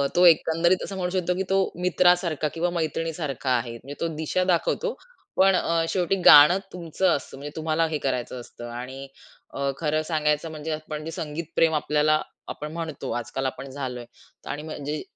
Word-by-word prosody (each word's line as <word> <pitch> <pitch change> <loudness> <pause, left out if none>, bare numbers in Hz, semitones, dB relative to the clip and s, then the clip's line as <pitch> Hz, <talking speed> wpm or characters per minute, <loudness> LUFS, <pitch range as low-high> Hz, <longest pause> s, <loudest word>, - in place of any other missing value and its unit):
तो 180 - +6
एकंदरीत 170 +2 +4
असं 195 - -6
म्हणू 180 -1 -1
शकतो, 180 -1 0
की 190 - 0
तो 195 - +3 0.2
मित्रासारखा 175 -4 +3
किंवा 170 +2 0
मैत्रिणीसारखा 160 -4 -3
आहे. 120 -1 0
म्हणजे 135 +5 -9
तो 170 - +1
दिशा 160 +4 0
दाखवतो, 185 - 0 0.4
पण 190 0 +5
अ, 165 -2 +1
शेवटी 185 0 +1
गाणं 145 +6 +9 0.2
तुमचं 180 +1 0
असतं. 135 -1 -7
म्हणजे 145 +2 -8
तुम्हाला 160 +1 +1
हे 155 - -2
करायचं 125 -1 -2
असतं 120 0 -10
आणि 130 +3 -7 0.7
खरं 155 -1 0
अ, - - 0
सांगायचं, 155 -1 0
म्हणजे 155 +1 -5
आपण 155 0 -5
जे 165 - -5
संगीतप्रेमी 160 +1 -1
आपल्याला 150 +1 +2 0.3
आपण 150 +1 -6
म्हणतो 160 -5 -5
आजकाल 135 +3 -4
आपण 135 +1 -4
झालोय 130 -3 -5 0.5
आणि 150 - -5
म्हणजे 150 -1 -5
155 Hz, 165 wpm, -25 LUFS, 145-170 Hz, 0.7 s, गाणं